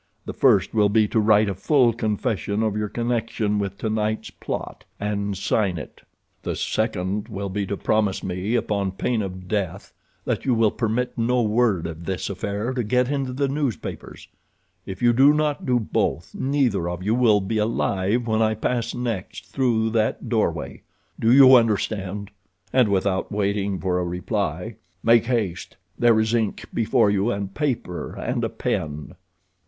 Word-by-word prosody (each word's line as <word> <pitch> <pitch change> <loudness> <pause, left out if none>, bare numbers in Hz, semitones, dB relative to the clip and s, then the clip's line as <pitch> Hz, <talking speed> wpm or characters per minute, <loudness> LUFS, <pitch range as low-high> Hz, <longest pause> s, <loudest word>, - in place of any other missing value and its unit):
The - - -5
first - - +3
will 105 -2 +3
be 105 +1 +3
to 110 - +1
write 105 0 +4
a 100 - -1
full 120 - +3
confession 105 -1 -1
of 110 -2 0
your 105 -1 -2
connection 115 -3 -1
with 100 -1 -3
tonight's 110 0 -2
plot—and 100 -1 -5
sign 95 -2 0
it. 75 - -9 0.4
"The - - -3
second 100 +4 -1
will 100 -3 -5
be 100 +1 -2
to 100 - -3
promise 105 -3 0
me 95 +5 -2
upon 100 -5 -1
pain 115 +3 -1
of 95 -2 -6
death 95 -2 -3 0.3
that - - -1
you 130 -3 +2
will 110 -2 +3
permit 120 +2 -1
no 120 +1 +2
word 110 -5 +1
of 85 0 -6
this 95 +1 -3
affair 100 +5 -3
to 125 -2 -1
get 125 +4 +1
into 135 -3 -1
the 140 +2 0
newspapers. 135 -4 -4 0.6
If 95 +3 -6
you 120 0 +5
do 135 +5 +6
not 150 -2 -1
do 125 -1 +3
both, 90 -5 -2
neither 130 -10 0
of 90 +1 -5
you 105 +3 +1
will 115 -4 +4
be 110 +3 -2
alive 105 +1 0
when 110 -1 +1
I 110 0 +2
pass 115 +1 -2
next 115 -6 -4
through 115 -4 +1
that 110 -1 0
doorway. - - -1 0.4
Do 115 - +3
you 130 0 +8
understand?" 105 -3 0 0.4
And, 125 -4 +4
without 95 -1 0
waiting 100 -1 -1
for 90 -1 0
a - - -1
reply: 90 +2 -3 0.3
"Make 115 0 +5
haste; 105 -8 -2 0.2
there 115 -2 +5
is 110 +1 +1
ink 110 -3 -1
before 105 -2 +2
you, 100 +2 +1
and 100 -3 -3
paper 125 - -3
and - - -2
a - - 0
pen." 75 -1 -3
105 Hz, 165 wpm, -23 LUFS, 100-120 Hz, 0.6 s, you